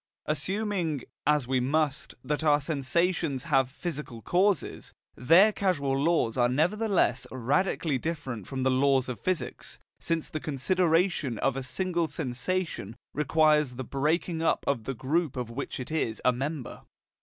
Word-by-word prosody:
Assuming, 175 Hz, -, -1 dB, 0.2 s
as 150 Hz, -4 st, +3 dB
we 130 Hz, 0 st, +2 dB
must, 145 Hz, +2 st, 0 dB
that 150 Hz, +1 st, -2 dB
our 150 Hz, -2 st, +4 dB
sensations 155 Hz, +1 st, 0 dB
have 135 Hz, -5 st, +2 dB
physical 140 Hz, -6 st, -6 dB
causes, 185 Hz, -2 st, 0 dB, 0.2 s
their 175 Hz, +11 st, +5 dB
causal 150 Hz, -10 st, 0 dB
laws 140 Hz, -5 st, +1 dB
are 120 Hz, 0 st, +4 dB
nevertheless 175 Hz, -, +1 dB
radically 140 Hz, +3 st, 0 dB
different 130 Hz, -, -4 dB
from 130 Hz, -1 st, -3 dB
the 130 Hz, -, +3 dB
laws 135 Hz, 0 st, +3 dB
of 125 Hz, -3 st, -5 dB
physics, 185 Hz, -3 st, -3 dB, 0.2 s
since 165 Hz, -2 st, -1 dB
the 155 Hz, -, -4 dB
consideration 165 Hz, -, +1 dB
of 135 Hz, +3 st, 0 dB
a 135 Hz, -, -2 dB
single 170 Hz, +6 st, -1 dB
sensation 145 Hz, -, -3 dB, 0.2 s
requires 150 Hz, -2 st, +3 dB
the 130 Hz, -, -4 dB
breaking 160 Hz, +6 st, -1 dB
up 165 Hz, -, +1 dB
of 120 Hz, -6 st, -1 dB
the 135 Hz, -, -3 dB
group 145 Hz, +4 st, -1 dB
of 120 Hz, -2 st, -4 dB
which 135 Hz, +3 st, -5 dB
it 125 Hz, -, -6 dB
is 115 Hz, -9 st, -1 dB
a 125 Hz, -, +6 dB
member. 135 Hz, +2 st, -4 dB
150 Hz, 145 wpm, -28 LUFS, 130-170 Hz, 0.2 s, a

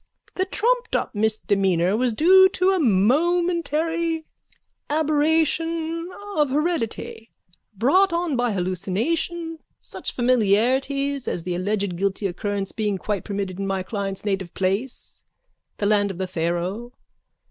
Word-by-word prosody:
The 375 Hz, -, 0 dB
trumped 480 Hz, +5 st, 0 dB
up -, -, -1 dB
misdemeanour 200 Hz, -4 st, +1 dB
was 245 Hz, +2 st, +1 dB
due 375 Hz, -, +6 dB
to 370 Hz, 0 st, +2 dB
a 380 Hz, -, +1 dB
momentary 325 Hz, -, +1 dB, 0.6 s
aberration 320 Hz, +2 st, +1 dB, 0.3 s
of 295 Hz, -2 st, +3 dB
heredity, 275 Hz, -6 st, -2 dB, 0.5 s
brought 355 Hz, -, +3 dB
on 340 Hz, -3 st, 0 dB
by 245 Hz, -1 st, +1 dB
hallucination, 225 Hz, -, -2 dB, 0.2 s
such -, -, -5 dB
familiarities 255 Hz, +4 st, +1 dB
as 170 Hz, -, -2 dB
the 180 Hz, 0 st, -3 dB
alleged 195 Hz, 0 st, -1 dB
guilty 200 Hz, +2 st, -1 dB
occurrence 195 Hz, +1 st, -2 dB
being 210 Hz, -3 st, -1 dB
quite 200 Hz, +1 st, -3 dB
permitted 195 Hz, -2 st, -4 dB
in 195 Hz, -, -2 dB
my 190 Hz, -1 st, -1 dB
client's 195 Hz, 0 st, -4 dB
native 190 Hz, -4 st, -2 dB
place, 195 Hz, +7 st, -3 dB, 0.5 s
the 205 Hz, -, -2 dB
land 205 Hz, -1 st, +3 dB
of 190 Hz, -, -6 dB
the 190 Hz, -, -2 dB
Pharaoh. 180 Hz, +7 st, -3 dB
235 Hz, 125 wpm, -23 LUFS, 195-325 Hz, 0.6 s, due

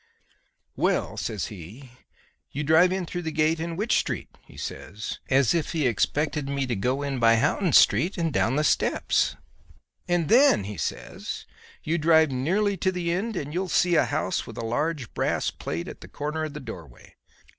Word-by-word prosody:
"'Well,' -, -, 0 dB
says 105 Hz, -4 st, -3 dB
he, 105 Hz, -, -11 dB, 0.6 s
'you 145 Hz, -, -3 dB
drive 160 Hz, +4 st, +5 dB
in 185 Hz, -1 st, -1 dB
through 175 Hz, +1 st, -4 dB
the 160 Hz, -2 st, -3 dB
gate 155 Hz, +1 st, +1 dB
in 165 Hz, +1 st, -3 dB
Wych 210 Hz, +6 st, -2 dB
Street,' -, -, -4 dB
he -, -, -15 dB
says, 105 Hz, +3 st, -6 dB
as 135 Hz, -3 st, +4 dB
if 170 Hz, -1 st, -1 dB
he 155 Hz, -4 st, 0 dB
expected 140 Hz, +6 st, 0 dB
me 140 Hz, -1 st, -1 dB
to 120 Hz, -2 st, -2 dB
go 130 Hz, +8 st, -1 dB
in 140 Hz, -2 st, -2 dB
by 115 Hz, -1 st, +5 dB
Houghton 170 Hz, -, +1 dB
Street 180 Hz, +5 st, +4 dB
and 165 Hz, -3 st, -1 dB
down 120 Hz, +2 st, +1 dB
the 150 Hz, -, +2 dB
steps, -, -, +1 dB, 0.7 s
'and 175 Hz, -3 st, +1 dB
then,' 245 Hz, -, +5 dB
he 105 Hz, +2 st, -6 dB
says, 80 Hz, -, -5 dB, 0.4 s
'you 165 Hz, +2 st, 0 dB
drive 160 Hz, -1 st, +4 dB
nearly 190 Hz, +10 st, 0 dB
to 185 Hz, +2 st, +1 dB
the 175 Hz, -2 st, -2 dB
end 205 Hz, +6 st, -2 dB
and 150 Hz, -3 st, -4 dB
you'll 185 Hz, +2 st, -2 dB
see 175 Hz, 0 st, +3 dB
a 165 Hz, -, +4 dB
house -, -, -2 dB
with -, -, -9 dB
a 115 Hz, -, -3 dB
large 145 Hz, +2 st, -2 dB
brass -, -, 0 dB
plate 85 Hz, +2 st, -5 dB
at -, -, -9 dB
the -, -, -10 dB
corner 150 Hz, +2 st, -3 dB
of 155 Hz, -, -7 dB
the -, -, -4 dB
doorway. 85 Hz, -, -11 dB
150 Hz, 190 wpm, -26 LUFS, 125-170 Hz, 0.7 s, drive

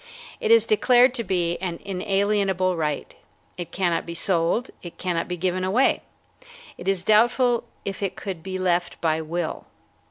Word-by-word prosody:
It 460 Hz, -3 st, -1 dB
is 460 Hz, 0 st, +6 dB
declared 250 Hz, -, +4 dB
to 240 Hz, -3 st, -3 dB
be 175 Hz, -4 st, 0 dB
an 175 Hz, -3 st, -4 dB
inalienable 195 Hz, -1 st, 0 dB
right. 150 Hz, -3 st, -2 dB, 0.4 s
It 175 Hz, -2 st, -6 dB
cannot 175 Hz, -3 st, 0 dB
be 170 Hz, -, -7 dB
sold. 180 Hz, +6 st, +1 dB
It 175 Hz, -, -10 dB
cannot 175 Hz, -2 st, -2 dB
be 180 Hz, -, -4 dB
given 185 Hz, +1 st, -1 dB
away. 210 Hz, +8 st, +2 dB, 0.7 s
It 175 Hz, -, -10 dB
is 195 Hz, -2 st, +1 dB
doubtful 240 Hz, +3 st, +3 dB, 0.2 s
if 195 Hz, 0 st, -4 dB
it 195 Hz, -, -2 dB
could 190 Hz, -5 st, -6 dB
be 185 Hz, +2 st, -5 dB
left 175 Hz, -2 st, 0 dB
by 160 Hz, -1 st, +1 dB
will. 165 Hz, +1 st, -4 dB
185 Hz, 160 wpm, -24 LUFS, 175-210 Hz, 0.7 s, is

